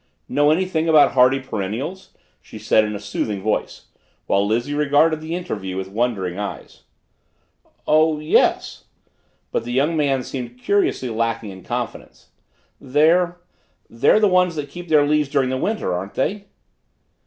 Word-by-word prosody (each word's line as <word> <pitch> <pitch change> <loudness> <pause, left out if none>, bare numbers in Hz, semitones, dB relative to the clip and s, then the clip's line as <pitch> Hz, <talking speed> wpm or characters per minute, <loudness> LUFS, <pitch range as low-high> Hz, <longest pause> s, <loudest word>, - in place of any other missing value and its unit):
"Know 145 +2 +2
anything 165 0 0
about 155 -2 +6
hardy 130 +1 +4
perennials?" 130 - -5 0.3
she - - -12
said 110 0 +3
in 105 0 -4
a - - -5
soothing 105 0 -3
voice, 110 - -2 0.4
while 100 0 +2
Lizzie 120 +6 -1
regarded 150 +2 +2
the 160 +2 -4
interview 95 - -5
with 95 0 -4
wondering 100 -4 -2
eyes. 105 - -7 1.0
"Oh. 155 0 +3
yes," 155 +1 +1 0.7
but - - -1
the 120 - -6
young 145 +6 +1
man 140 -4 +1
seemed 125 -2 -7
curiously 130 -4 0
lacking 115 -2 -2
in 95 -1 -11
confidence. - - -6 0.5
"They 155 +7 +3 0.7
they're 125 - +3
the 215 - +4
ones 180 -2 +2
that 145 -2 -5
keep 175 0 -9
their 150 -2 +4
leaves 150 -1 +1
during 135 -3 +1
the 130 - -1
winter, 210 - -1
aren't 95 +3 -5
they?" 200 +9 -2
135 Hz, 150 wpm, -21 LUFS, 110-160 Hz, 1.0 s, about